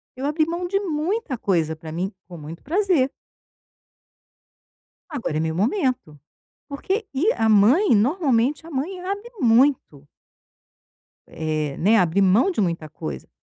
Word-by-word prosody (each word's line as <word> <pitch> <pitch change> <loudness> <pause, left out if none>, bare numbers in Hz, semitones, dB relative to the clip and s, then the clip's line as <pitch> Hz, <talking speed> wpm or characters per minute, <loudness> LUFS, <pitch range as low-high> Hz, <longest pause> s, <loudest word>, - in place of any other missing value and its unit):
eu 260 +2 -5
abri 305 +2 +1
mão 345 +2 -3
de 395 +2 0
muita 340 - -2
coisa 165 -7 0
para 160 0 -10
mim 180 +5 -3 0.2
com 175 -2 -10
muito 160 +2 -10
prazer. 335 -5 +1 2.0
Agora 240 - -3
é - - 0
meu 160 0 -1
momento, 240 - -1 0.5
porque 380 +10 -3
e 330 +12 +2
a 225 - 0
mãe 230 - +5
normalmente 270 - +1
a - - -10
mãe 320 +7 -3
abre 400 +5 -5
muito. 235 - +2 1.2
É, 155 -3 -3
né, 215 +6 +4
abre 180 0 +2
mão 200 - +4
de 280 - -1
muita 170 -4 -2
coisa 75 - -7
250 Hz, 140 wpm, -22 LUFS, -, 2.0 s, mãe